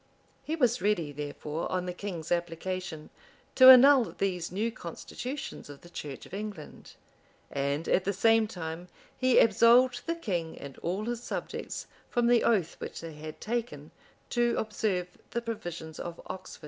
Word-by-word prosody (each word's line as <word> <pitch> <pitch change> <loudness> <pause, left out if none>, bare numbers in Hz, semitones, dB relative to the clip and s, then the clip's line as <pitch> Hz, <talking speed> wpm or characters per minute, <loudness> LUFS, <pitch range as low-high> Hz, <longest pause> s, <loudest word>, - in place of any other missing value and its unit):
He 315 - -2
was 250 -5 +2
ready, 175 -8 +1
therefore, 150 +2 -5
on 185 -1 -1
the 180 - -3
king's 175 -4 -6
application, 175 -1 -3 0.4
to 260 0 +9
annul 260 -1 +8
these 180 -3 -1
new 215 +5 -1
constitutions 245 - -7
of 145 -1 -11
the 175 - -15
church 145 -5 -7
of - - -15
England.[] 200 -6 -7 0.6
And, 140 +3 -1
at 185 - +3
the 200 - 0
same 225 +2 +4
time, 175 -3 -6 0.3
he 255 -1 +3
absolved 245 +4 +5
the 335 - 0
king 175 - -3
and 140 -1 -9
all 190 +5 -2
his 240 0 -3
subjects - - -5 0.2
from 240 -1 +1
the 240 0 +4
oath 190 -8 +1
which - - -6
they 165 -1 -7
had 155 +1 -9
taken 235 +2 -4 0.4
to 240 -1 +2
observe 195 -5 -2
the 235 - -2
provisions 175 -8 -6
of 170 -1 -6
Oxford. 185 0 -8
190 Hz, 160 wpm, -29 LUFS, 165-235 Hz, 0.6 s, to